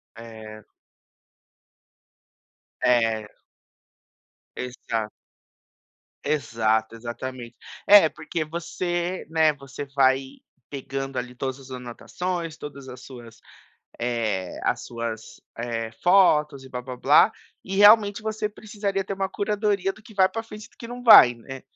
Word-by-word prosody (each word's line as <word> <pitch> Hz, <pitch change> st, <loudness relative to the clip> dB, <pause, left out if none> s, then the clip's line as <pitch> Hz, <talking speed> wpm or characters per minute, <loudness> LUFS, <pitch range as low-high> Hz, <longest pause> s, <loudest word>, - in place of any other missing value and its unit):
É. 110 Hz, -2 st, -11 dB, 2.2 s
É. 115 Hz, -4 st, +2 dB, 1.2 s
Exa 115 Hz, -3 st, -4 dB, 1.1 s
Exato, 115 Hz, -5 st, 0 dB
exatamente. 120 Hz, +1 st, -7 dB, 0.3 s
É, 200 Hz, -4 st, +9 dB
porque 155 Hz, +1 st, -5 dB
você, 175 Hz, +2 st, -3 dB
né, 160 Hz, -1 st, +3 dB
você 140 Hz, 0 st, -8 dB
vai 135 Hz, -1 st, +2 dB, 0.3 s
pegando 135 Hz, -1 st, -5 dB
ali 125 Hz, 0 st, -4 dB
todas 130 Hz, +1 st, -4 dB
as 135 Hz, -1 st, -14 dB
anotações, 165 Hz, +7 st, -5 dB
todas 140 Hz, -2 st, -9 dB
as 125 Hz, -1 st, -10 dB
suas, 120 Hz, -3 st, -12 dB, 0.6 s
eh, 110 Hz, -6 st, -2 dB
as -, -, -1 dB
suas, 115 Hz, -2 st, -6 dB, 0.2 s
eh, 115 Hz, -1 st, -3 dB
fotos 150 Hz, -7 st, +4 dB
e -, -, -12 dB
blá-blá-blá, 130 Hz, -, +3 dB, 0.3 s
e 195 Hz, -, -4 dB
realmente 205 Hz, 0 st, +6 dB
você 215 Hz, -1 st, -2 dB
precisaria 205 Hz, -2 st, -4 dB
ter 195 Hz, -, -5 dB
uma 195 Hz, 0 st, -2 dB
curadoria 205 Hz, -1 st, -1 dB
do 215 Hz, -, -18 dB
que 215 Hz, 0 st, -15 dB
vai 190 Hz, -2 st, +4 dB
pra 225 Hz, +4 st, -4 dB
frente 215 Hz, -1 st, -11 dB
e -, -, -25 dB
do -, -, -28 dB
que 230 Hz, -, -9 dB
não 245 Hz, +1 st, -8 dB
vai, 170 Hz, -, +9 dB
né. 135 Hz, +3 st, -10 dB
135 Hz, 120 wpm, -24 LUFS, 120-190 Hz, 2.2 s, É